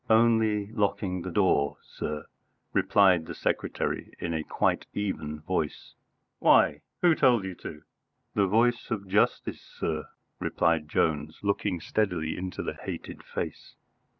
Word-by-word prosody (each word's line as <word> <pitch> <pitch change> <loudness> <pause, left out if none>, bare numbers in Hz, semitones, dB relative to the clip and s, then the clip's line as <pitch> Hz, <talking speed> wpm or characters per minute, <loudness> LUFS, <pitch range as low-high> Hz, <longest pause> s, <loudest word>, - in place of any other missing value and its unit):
"Only 110 -2 +4
locking 100 -4 0
the 90 - -4
door, 85 -6 +2
sir," 75 -1 -5 0.5
replied 95 -5 +4
the - - -6
secretary - - -2
in 85 -1 -3
a 80 -1 -1
quite - - 0
even 75 -7 -3
voice. 80 -2 -3 0.5
"Why? - - +5 0.2
Who 175 -2 +7
told 125 -8 +4
you 95 - -4
to 75 -1 -8 0.2
?" - - -49
"The 100 -2 +3
voice 120 +4 +2
of 100 -4 -3
Justice, 100 +3 +1
sir," 80 -1 -3 0.3
replied 80 -2 +1
Jones, 75 0 0
looking 100 -2 0
steadily 90 -4 -1
into 90 0 -4
the - - -3
hated - - -7
face. - - -6
95 Hz, 135 wpm, -28 LUFS, 80-105 Hz, 0.5 s, Who